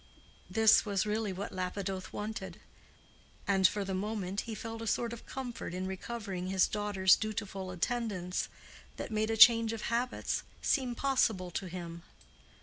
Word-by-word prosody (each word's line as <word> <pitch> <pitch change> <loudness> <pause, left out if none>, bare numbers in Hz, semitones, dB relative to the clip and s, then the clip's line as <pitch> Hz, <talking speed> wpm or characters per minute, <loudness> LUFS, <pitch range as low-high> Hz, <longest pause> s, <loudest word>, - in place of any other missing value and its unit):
This 220 +3 +6
was 200 -1 0
really 210 -1 -1
what 190 +2 -5
Lapidoth 185 0 -3
wanted. 215 +1 -5 0.9
And 195 -1 +5
for 205 0 -2
the 190 - -3
moment 200 0 -2
he 220 - -3
felt 225 +1 -6
a 225 - -4
sort 235 +1 0
of 235 - -10
comfort 245 -9 -5
in 185 +1 -3
recovering 190 -1 -4
his 190 -1 +4
daughter's 205 -3 +3
dutiful 200 -3 -4
attendance, 185 -1 -2 0.5
that - - -5
made 215 0 0
a 225 - 0
change 230 0 +8
of 225 - -5
habits 245 +2 -1 0.2
seem 255 -4 +1
possible 225 -9 +1
to 185 +2 -3
him. 170 -1 -7
205 Hz, 150 wpm, -32 LUFS, 185-225 Hz, 0.9 s, change